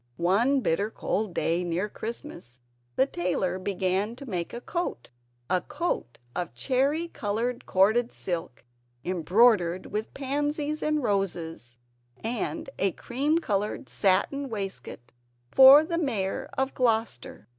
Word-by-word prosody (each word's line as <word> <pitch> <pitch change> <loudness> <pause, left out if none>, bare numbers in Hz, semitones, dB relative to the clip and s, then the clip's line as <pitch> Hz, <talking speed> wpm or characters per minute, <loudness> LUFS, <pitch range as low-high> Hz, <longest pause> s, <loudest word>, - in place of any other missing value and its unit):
One 225 +11 +3
bitter 200 +2 0
cold 215 -2 -2
day 170 +2 +1
near 175 +3 -1
Christmastime 205 - -8 0.3
the 265 - +4
tailor 180 -3 -1
began 195 +3 -1
to 275 - -10
make 180 -8 -3
a 240 - -5
coat 345 - -4 0.4
(a 185 -1 +1
coat 300 - -3 0.2
of 175 -9 -3
cherry 270 - +1
coloured 235 +3 -2
corded 220 +6 +3
silk 170 -7 -4 0.4
embroidered 185 +1 +3
with 215 +2 -4
pansies 290 +2 -1
and 305 -2 0
roses) 170 - -2 0.4
and 225 - -3
a 195 -2 +2
cream 285 +6 0
coloured 210 -9 -2
satin 270 +8 +1
waistcoat 195 - -6 0.4
for 270 +3 +9
the 335 +1 -2
Mayor 215 - -1
of 265 0 0
Gloucester. 225 - -1
210 Hz, 125 wpm, -27 LUFS, 180-265 Hz, 0.4 s, for